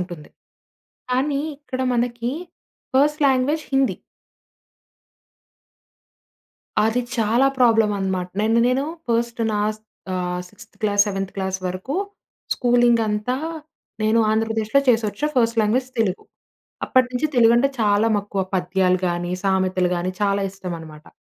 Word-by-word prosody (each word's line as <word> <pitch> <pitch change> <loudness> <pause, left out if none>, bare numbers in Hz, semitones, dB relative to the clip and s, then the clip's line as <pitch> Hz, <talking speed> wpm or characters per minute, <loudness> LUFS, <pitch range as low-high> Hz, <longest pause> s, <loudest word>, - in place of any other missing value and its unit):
ఉంటుంది. 175 -4 -7 0.8
కానీ 275 +3 +1 0.2
ఇక్కడ 260 -3 -6
మనకి 240 0 -1 0.6
ఫస్ట్ 295 +3 +3
లాంగ్వేజ్ 275 +4 +2
హిందీ. 270 0 +2 2.9
అది 225 +3 +1 0.2
చాలా 230 +4 +3
ప్రాబ్లమ్ 225 -4 +4
అనమాట. 190 -2 -1
నన్ను 225 +2 +2
నేను 255 +2 +1 0.3
ఫర్స్ట్ 235 0 0
నాస్ 210 +1 -1 0.4
ఆహ్, 180 0 -2
సిక్స్‌థ 230 +3 -16
క్లాస్ 205 -1 +3
సెవెంత్ 195 -1 -3
క్లాస్ 190 -1 -2
వరకు 185 +10 -5 0.6
స్కూలింగ్ 240 -1 +3
అంతా 210 +4 -1 0.7
నేను 220 +2 +3
ఆంధ్రప్రదేశ్‌లొ 225 +3 +1
చేసొఛా 225 +2 +2
ఫర్స్ట్ 230 -1 +2
లాంగ్వేజ్ 250 +5 +1
తెలుగు. 195 -4 -1 0.6
అప్పటినుంచి 255 +2 +2
తెలుగు 230 -1 +6
అంటే 275 +3 +2
చాలా 210 +1 +3
మక్కువ. 200 -1 -3
పద్యాలు 185 0 +1
కాని 175 0 -2
సామెతలు 185 -2 +1
గాని 175 +1 -2
చాలా 200 0 +2
ఇష్టం 185 -2 -6
అనమాట. 155 -1 -12
220 Hz, 115 wpm, -22 LUFS, 190-245 Hz, 2.9 s, తెలుగు